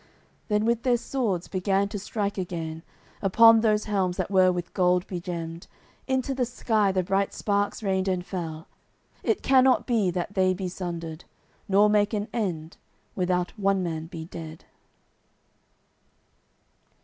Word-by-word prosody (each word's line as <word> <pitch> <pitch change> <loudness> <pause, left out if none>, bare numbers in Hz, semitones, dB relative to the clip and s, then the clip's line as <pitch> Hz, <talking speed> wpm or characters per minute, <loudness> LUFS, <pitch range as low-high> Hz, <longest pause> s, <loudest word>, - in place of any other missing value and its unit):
Then 210 0 +1
with 235 0 +1
their 245 -1 +2
swords 225 -9 -2
began 195 +1 0
to 205 -1 -4
strike 205 0 -3
again 165 -3 -4 0.4
Upon 225 +3 +7
those 215 -1 +2
helms 190 -4 -1
that - - -2
were 185 -1 +5
with 175 -1 -5
gold 180 0 +2
begemmed 170 -2 -6 0.4
Into 265 0 0
the 260 -1 0
sky 220 -4 +1
the 185 -1 0
bright 195 +2 0
sparks 205 +1 -1
rained 190 -1 0
and 180 -2 -1
fell. 165 -4 -5 0.5
It 425 - 0
cannot 260 -1 +4
be 220 -6 +2
that 180 +2 -3
they 185 -1 +2
be 185 -1 -4
sundered, 170 -3 -6 0.4
Nor 200 +2 +5
make 210 +1 +2
an 210 +1 -3
end, 175 -8 -3 0.4
without 180 -1 0
one 195 -1 +2
man 160 -2 -4
be 165 -2 -7
dead. 160 -2 -9
190 Hz, 145 wpm, -26 LUFS, 175-210 Hz, 0.5 s, Upon